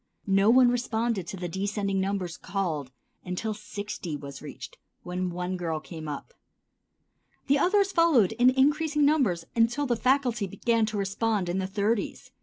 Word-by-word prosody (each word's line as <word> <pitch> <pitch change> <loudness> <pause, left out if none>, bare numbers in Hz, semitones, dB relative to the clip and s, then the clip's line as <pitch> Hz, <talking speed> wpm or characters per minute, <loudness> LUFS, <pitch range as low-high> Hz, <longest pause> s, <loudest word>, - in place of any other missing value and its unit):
No 195 +1 +4
one 245 0 +6
responded 230 -5 -1
to 195 - -6
the 180 -1 -4
descending 195 +2 -1
numbers 190 -3 -2
called 170 -8 -3 0.3
until 185 +5 -3
sixty 205 -6 -6
was 140 -2 -9
reached, - - -9 0.2
when 180 +1 -2
one 180 +1 -3
girl 165 -3 -2
came 160 0 -9
up. 150 - -6 1.1
Then 280 +1 +4
others 395 +4 +3
followed 330 - +4
in 245 +3 +4
increasing 295 +3 +2
numbers 240 - +2
until 235 +5 +2
the 245 -3 +1
faculty 245 -3 +1
began 225 +4 +1
to 215 -1 -3
respond 200 -1 0
in 180 +2 0
the 190 - -2
thirties. 205 +2 -2
205 Hz, 155 wpm, -27 LUFS, 180-245 Hz, 1.1 s, one